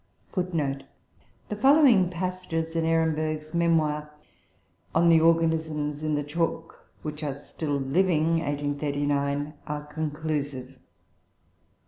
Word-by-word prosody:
[Footnote 160 -8 -1
5: - - -22 0.6
The 210 - -2
following 260 - +5
passages 175 -2 -3
in 165 -1 +1
Ehrenberg's 155 -1 0
memoir 155 -3 +1 0.9
on 170 +1 +5
The 165 -1 +6
Organisms 160 -3 +1
in 155 -1 0
the 145 - -1
Chalk 165 +3 -3
which 150 0 -5
are 140 -3 -2
still 145 +1 -4
living 165 +3 +2
(1839), 145 -1 -1
are 150 0 -4
conclusive: 150 -3 -3
"7. 135 -1 -20
155 Hz, 110 wpm, -26 LUFS, 145-165 Hz, 0.9 s, The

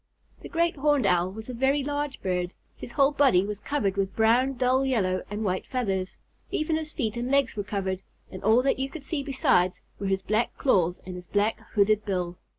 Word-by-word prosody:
The - - -9
Great 335 -1 +1
Horned 290 -3 +2
Owl 180 -1 +2
was 220 +2 -8
a 255 - -5
very 270 +4 +1
large 290 0 -3
bird. 180 -1 -1 0.2
His 240 - -9
whole 275 -1 +4
body 270 -11 +4
was 205 0 -4
covered 205 -8 -1
with 195 -1 -1
brown, 240 +4 +3
dull 255 +1 +2
yellow, 200 -9 +1
and 210 +2 -3
white 185 -2 -1
feathers. 195 -7 -2 0.3
Even 310 +1 0
his 315 -1 -2
feet 225 -8 -2
and 240 +1 -2
legs 275 -2 +2
were 205 - -1
covered, 190 -2 -3 0.3
and 185 - -8
all 220 +5 +4
that 270 -1 +1
you 270 +1 -1
could 310 -1 -9
see 295 0 -2
besides 255 -10 +2 0.2
were 200 - -2
his 190 0 0
black 215 +4 0
claws 180 -9 +2
and 185 - -6
his 180 0 -9
black 205 +2 +1 0.2
hooked 210 +1 +3
bill. 180 -3 -3
220 Hz, 210 wpm, -27 LUFS, 190-270 Hz, 0.3 s, whole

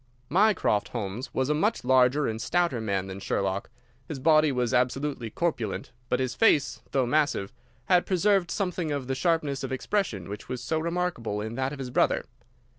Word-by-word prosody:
Mycroft 190 - +3
Holmes 115 +2 -5
was 130 - 0
a - - +3
much 210 +9 0
larger 130 +3 +4
and 110 0 -3
stouter 170 -9 +1
man 100 -3 -1
than 95 0 -7
Sherlock. 100 0 -2 0.4
His 155 - -5
body 155 +2 +4
was 125 -3 0
absolutely 125 -1 0
corpulent, 150 -4 -2 0.2
but 125 - +1
his 130 -2 -1
face, 145 - +3
though 135 -2 +1
massive, 135 -7 0 0.3
had 180 -1 +3
preserved 190 -1 +2
something 180 -5 -2
of 140 -3 -2
the 135 - -2
sharpness 150 -3 0
of 135 - -4
expression 130 - -1
which 105 +1 -8
was 125 - -3
so 160 +5 0
remarkable 170 -11 -2
in 110 +2 -4
that 130 +2 -1
of 145 - -6
his 130 -2 -6
brother. - - +2
135 Hz, 180 wpm, -27 LUFS, 115-165 Hz, 0.4 s, larger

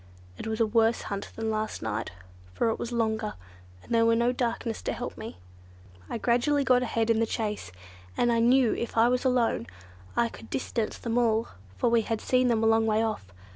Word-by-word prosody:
It 105 - -7
was 220 0 -2
a 225 - +4
worse 225 +1 +2
hunt 200 0 -5
than 225 0 -2
last 215 - -3
night, 110 -1 -2 0.5
for 230 - +2
it 225 - -2
was 235 - -4
longer, 220 -2 -1 0.5
and - - -6
there 230 0 +4
was 230 0 +4
no 235 +1 +3
darkness 235 -2 -2
to - - -2
help - - -5
me. - - -8 0.7
I - - -2
gradually 245 +5 +2
got 250 -2 +4
ahead 230 -2 0
in 225 - +2
the 230 - +2
chase, 210 - -3 0.5
and 240 - +3
I 230 - +2
knew 245 +1 +4
if 235 - -4
I 225 +1 +6
were 250 0 +2
alone 245 - +1 0.5
I 235 - +3
could 225 - -12
distance 230 -4 -2
them 235 0 -1
all; 225 -1 +1 0.3
for - - +1
we 235 -1 +4
had 225 0 -2
seen 255 +2 +2
them 225 -2 +2
a - - +3
long 225 0 +4
way 220 +1 +2
off. 215 - -3
230 Hz, 210 wpm, -28 LUFS, 220-240 Hz, 0.7 s, I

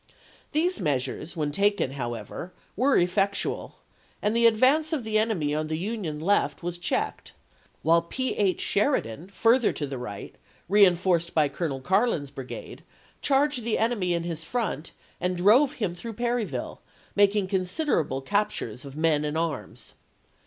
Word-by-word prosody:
These 345 +5 +1
measures 145 +2 -2
when 150 -2 -1
taken, 200 -4 +1
however, 120 - -5 0.2
were 260 +5 +3
effectual, 195 +3 0 0.4
and 210 +2 0
the 235 0 +6
advance 270 +8 +3
of 285 -6 -1
the 215 -1 +1
enemy 190 -10 0
on 155 +1 -1
the 155 0 -2
Union 185 -5 -3
left 190 +1 +1
was 175 0 -4
checked; 175 - -2 0.5
while 165 +2 +5
P. 260 +10 -3
H. 190 -4 +1
Sheridan, 185 - 0
further 230 +4 +3
to 145 - -3
the 135 -2 -5
right, 105 -5 -7 0.3
reenf 185 -3 +5
orced 170 -2 +1
by 150 -3 +4
Colonel 140 -6 -3
Carlin's 185 - +1
brigade, 135 -2 -8 0.4
charged 275 -2 +2
the 230 -1 0
enemy 210 -6 +1
in 170 - -2
his 165 -2 -4
front, 185 - -3 0.3
and 180 0 -1
drove 240 +10 +5
him 210 -11 -2
through 225 +6 -7
Perryville, 240 0 -2 0.3
making 205 0 +4
consid 190 - -1
erable 135 - 0
captures 200 - -1
of 140 -1 -10
men 155 -2 +2
and 150 +1 -2
arms. 165 -2 -4
185 Hz, 150 wpm, -26 LUFS, 155-225 Hz, 0.5 s, the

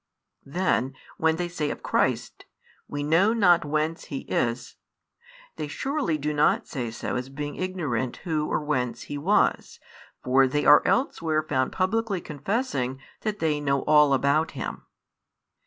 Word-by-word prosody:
Then, 140 -4 0 0.2
when 160 0 +2
they 175 +1 -2
say 160 -4 -3
of - - -6
Christ: - - -1 0.4
We 145 0 -4
know 165 +9 +3
not 180 -7 +4
whence 155 +2 -1
He 140 - -5
is, 120 0 -2 0.8
they 150 - -3
surely 235 - -1
do 150 +1 -2
not 150 0 +2
say 125 -4 -4
so 115 - -4
as 125 +1 -5
being 145 +1 -5
ignorant 155 -10 -2
Who 155 -3 0
or - - 0
whence 125 -5 -2
He 145 - -6
was, 195 +8 +1 0.4
for 130 +1 +4
they 145 +3 -1
are 150 - +8
elsewhere 160 - +1
found 130 -4 0
publicly 200 +1 0
confessing 145 - -2 0.2
that 215 -1 -3
they 155 -4 0
know 140 -1 0
all 150 -2 +5
about 145 +4 +1
Him. - - -6
150 Hz, 150 wpm, -26 LUFS, 135-175 Hz, 0.8 s, are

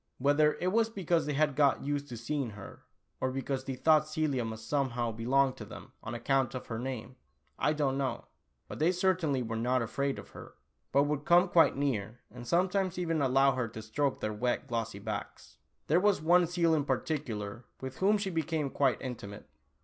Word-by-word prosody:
Whether 145 +3 +3
it 180 +1 -1
was 225 +1 +2
because 175 -7 0
they 150 - -1
had 150 -1 +2
got 140 -1 +3
used 145 0 -2
to 120 - -6
seeing 135 +2 -2
her, 100 - -11 0.3
or 130 - 0
because 135 0 -3
they 135 - -3
thought 155 +3 +4
Celia 155 -5 0
must 110 0 -6
somehow 125 -5 0
belong 130 +4 +2
to - - -9
them - - -11
on 115 +2 -6
account 130 +1 0
of 130 - -5
her 115 -1 -5
name, 130 0 -5 0.4
I 150 - +2
don't 140 -3 0
know, 135 -1 -2 0.4
but - - -8
they 160 +4 +4
certainly 180 -7 +1
were 115 -1 -4
not 125 +2 +1
afraid 140 +4 -2
of - - -10
her, - - -12 0.4
but 140 +1 +4
would 145 0 -1
come 175 +4 +5
quite 165 -5 +4
near, 120 -5 -2
and 120 +1 -10
sometimes 185 +2 +1
even 165 -3 0
allow 135 +1 +4
her 125 -2 -1
to 110 0 -8
stroke 135 +5 -1
their 110 - -2
wet 120 +3 -1
glossy 115 -3 -3
backs. 100 - -6 0.3
There 160 +4 +3
was 205 0 +3
one 175 +2 +4
seal 170 -1 +2
in 150 -3 +1
particular, 120 -6 -3
with 130 0 -7
whom 205 +3 +4
she 195 -2 -3
became 160 -3 -1
quite 135 -5 +2
intimate. 105 -5 -7
140 Hz, 195 wpm, -31 LUFS, 120-155 Hz, 0.4 s, come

